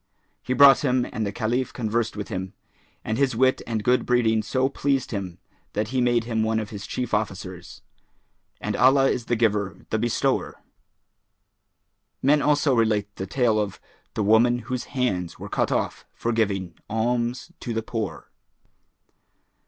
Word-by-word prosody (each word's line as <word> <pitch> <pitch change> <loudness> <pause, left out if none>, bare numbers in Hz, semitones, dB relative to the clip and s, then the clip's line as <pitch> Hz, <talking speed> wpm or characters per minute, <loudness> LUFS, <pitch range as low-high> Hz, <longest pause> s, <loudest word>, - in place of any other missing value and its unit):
He 130 - -2
brought 140 0 +8
him 125 -3 +2
and 110 -2 -1
the - - -2
Caliph 120 +4 -1
conversed 115 -1 -1
with 105 - -5
him; 95 -1 -4 0.5
and 110 +3 -1
his 135 -4 +2
wit 130 +2 +3
and 110 -2 -2
good 125 +2 +3
breeding 115 -3 +2
so 130 +4 0
pleased 135 -1 -1
him 95 -5 -4 0.4
that 105 +1 -1
he 130 0 0
made 120 -1 +2
him 115 -1 -1
one 110 0 +1
of 110 -2 -5
his 105 0 -7
chief 125 -3 -4
officers. 95 -4 -4 0.8
And - - -3
Allah 135 +2 +5
is 120 - -3
the 120 - +1
Giver, 105 -4 0
the 110 - +1
Bestower! 120 +1 -1 1.6
Men 145 +2 +3
also 145 -1 +3
relate 110 -3 +1
the 95 - -4
tale 115 0 +2
of 105 -2 -3 0.4
THE 105 - 0
WOMAN 120 +3 +4
WHOSE 125 - -2
HANDS 95 -10 -2
WERE - - -8
CUT - - 0
OFF - - -2
FOR 120 - -1
GIVING 100 -6 0 0.2
ALMS 120 +7 -1
TO 120 - -5
THE 115 -1 -2
POOR. 110 -2 -5
115 Hz, 160 wpm, -24 LUFS, 105-125 Hz, 1.6 s, brought